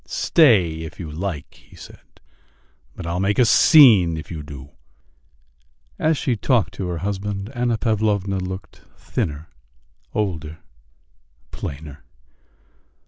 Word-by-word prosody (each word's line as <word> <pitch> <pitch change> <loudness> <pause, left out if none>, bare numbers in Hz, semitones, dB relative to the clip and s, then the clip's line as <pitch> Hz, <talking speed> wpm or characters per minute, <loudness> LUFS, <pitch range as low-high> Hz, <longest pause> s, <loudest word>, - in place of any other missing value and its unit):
"Stay 100 - +3
if 80 - -9
you 80 -4 -6
like," 80 -2 -5
he - - -20
said, - - -16 0.8
"but - - -8
I'll 85 +2 -2
make 100 +2 0
a 125 - +5
scene 110 - +6
if 80 +1 -9
you 80 -3 -5
do." 70 -1 -11 1.3
And - - 0
as 160 -1 +2
she 125 - -1
talked 110 - 0
to 95 - -5
her 90 -1 -3
husband 100 +3 -4
Anna 120 -2 0
Pavlovna 105 -4 0
looked 95 +1 -7 0.2
thinner, 75 +1 -4 0.7
older, 80 -7 -3 0.9
plainer. 75 0 -8
95 Hz, 125 wpm, -21 LUFS, 80-110 Hz, 1.3 s, scene